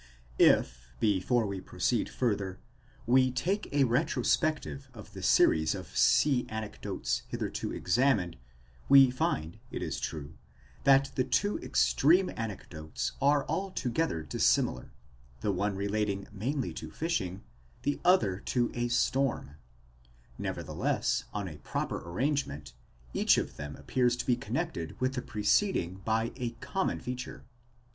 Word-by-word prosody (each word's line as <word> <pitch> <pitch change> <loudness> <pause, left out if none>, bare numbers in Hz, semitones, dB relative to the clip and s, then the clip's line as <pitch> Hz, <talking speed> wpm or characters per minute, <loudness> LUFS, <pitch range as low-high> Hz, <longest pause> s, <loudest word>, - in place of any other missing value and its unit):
If, - - +4
before 105 - +2
we 100 -2 -4
proceed 105 +7 -1
further, 100 -6 -1 0.5
we 130 +2 +4
take 175 +12 -2
a 145 -1 +3
retrospect 145 +4 +1
of 125 -7 -10
the 95 - -8
series 80 -3 +4
of - - -9
sea 135 -5 +4
anecdotes 110 -1 -3
hitherto - - -3
examined, 100 -5 +1 0.5
we 135 -2 +8
find, 80 -10 -2
it - - -4
is - - -3
true, 75 -1 -5 0.5
that 135 0 +5
the 130 - +1
two 205 +11 0
extreme 175 +7 +3
anecdotes 85 -8 -5
are 145 0 +3
altogether 160 - -1
dissimilar, 65 -4 +1 0.5
the 105 - +1
one 100 +2 -1
relating 100 0 -1
mainly 125 +6 -2
to - - -7
fishing, 105 - -2 0.4
the 145 - 0
other 105 - +3
to 120 +2 0
a 120 0 -1
storm; 125 - 0 0.9
nevertheless, - - -1
on 100 -2 -3
a 75 -4 -8
proper - - -3
arrangement, 90 - -2 0.4
each - - +4
of - - -2
them 75 0 -6
appears 125 -1 +1
to 125 - -4
be 125 - +3
connected 80 -8 -4
with 130 +1 0
the 125 - -2
preceding 105 - +1
by 115 +2 0
a 125 -3 -2
common 140 +11 -2
feature. 125 0 -6
120 Hz, 130 wpm, -30 LUFS, 95-135 Hz, 0.9 s, we